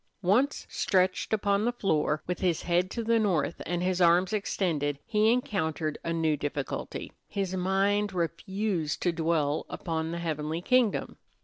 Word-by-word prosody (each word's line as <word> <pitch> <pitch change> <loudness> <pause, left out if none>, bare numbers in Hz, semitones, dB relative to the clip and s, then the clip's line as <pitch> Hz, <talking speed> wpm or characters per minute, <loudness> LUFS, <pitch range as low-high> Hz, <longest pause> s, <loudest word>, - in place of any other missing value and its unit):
Once 245 +11 +2
stretched 185 -1 +1
upon 200 -1 +2
the 240 - +2
floor, 155 -9 0
with 180 0 -3
his 175 -4 0
head 175 +1 +1
to 235 - -3
the 230 0 +3
north 175 -6 0
and 175 +1 -1
his 185 0 0
arms 175 +3 +4
extended, 160 -8 0
he 220 0 +3
encountered 160 -10 -1
a 165 - -2
new 160 -2 +1
difficulty: 145 -2 -4 0.2
his 195 -2 -2
mind 195 +2 +1
refused 180 0 -2
to 175 - +1
dwell 160 -3 0
upon 160 -2 -3
the 170 - -3
heavenly 160 -1 -2
kingdom. 245 +2 +1
180 Hz, 150 wpm, -28 LUFS, 160-200 Hz, 0.2 s, arms